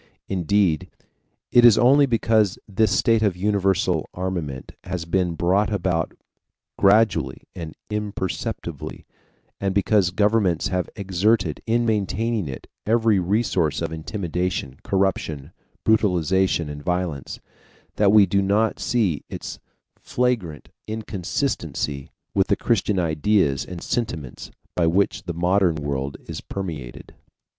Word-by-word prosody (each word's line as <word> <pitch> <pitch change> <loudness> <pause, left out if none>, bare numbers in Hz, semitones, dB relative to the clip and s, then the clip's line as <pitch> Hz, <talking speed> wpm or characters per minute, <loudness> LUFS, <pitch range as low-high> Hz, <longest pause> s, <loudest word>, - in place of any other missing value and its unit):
Indeed, 95 -3 +1 0.6
it 120 - +6
is 120 -3 +8
only 135 +5 +5
because 110 -4 +2
this 105 +1 +2
state 115 +1 +3
of 100 -5 +1
universal 95 -1 +1
armament 85 -8 -4
has 90 -2 -4
been 90 0 0
brought 95 +6 +2
about 90 -5 -1 0.6
gradually 100 -9 +3
and 80 -3 -7 0.2
imperceptibly, 100 -5 -4 0.5
and 95 -1 -1
because 100 -2 +3
governments 100 -2 +1
have 90 -2 -1
exerted, 95 -3 +1
in 120 +1 +2
maintaining 110 -1 0
it, 65 - -7 0.2
every 110 -2 +3
resource 90 -4 +1
of - - -3
intimidation, 85 -4 -3
corruption, 90 -7 -1 0.3
brutalization, 95 -5 +2
and 75 0 -7
violence, 90 -5 -3 0.6
that 100 -2 +4
we 105 -1 +7
do 100 0 +1
not 105 +3 +1
see 100 - 0
its - - -7 0.4
flagrant 115 -12 -2 0.2
inconsistency 95 - -3 0.2
with 95 0 +2
the 100 - +3
Christian 105 -3 +1
ideas 80 -3 +1
and 90 -2 -8
sentiments 80 - -3 0.3
by 85 -2 +2
which 95 +5 +1
the 85 - -3
modern 90 0 +2
world 70 -2 -3
is - - -6
permeated. 80 -11 -7
95 Hz, 115 wpm, -23 LUFS, 85-105 Hz, 0.6 s, is